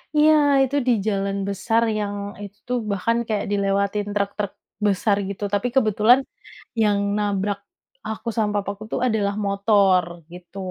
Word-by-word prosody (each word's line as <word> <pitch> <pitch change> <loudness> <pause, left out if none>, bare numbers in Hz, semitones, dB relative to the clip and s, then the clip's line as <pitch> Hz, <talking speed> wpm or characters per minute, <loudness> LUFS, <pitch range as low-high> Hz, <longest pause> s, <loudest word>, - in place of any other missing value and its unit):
Iya 305 +1 +6 0.3
itu 265 +1 -1
di - - +5 0.2
jalan 200 -1 -1
besar 225 +4 +1 0.2
yang 205 0 -3 0.3
itu 200 0 -10
tuh 250 0 0
bahkan 230 +4 0
kayak 215 -2 -1
dilewatin 200 +1 0
truk-truk 200 0 -2 0.3
besar 200 +1 +2
gitu, 200 +1 -6
tapi 205 +5 +1
kebetulan 220 0 +5 0.6
yang 205 -1 +3 0.2
nabrak 205 -1 -1 0.5
aku 220 +2 -6
sama 210 -2 +1
papaku 200 +1 -3
tuh - - -1
adalah 205 -4 0
motor, 200 -2 +3 0.3
gitu. 180 +1 -12
205 Hz, 140 wpm, -22 LUFS, 200-215 Hz, 0.6 s, Iya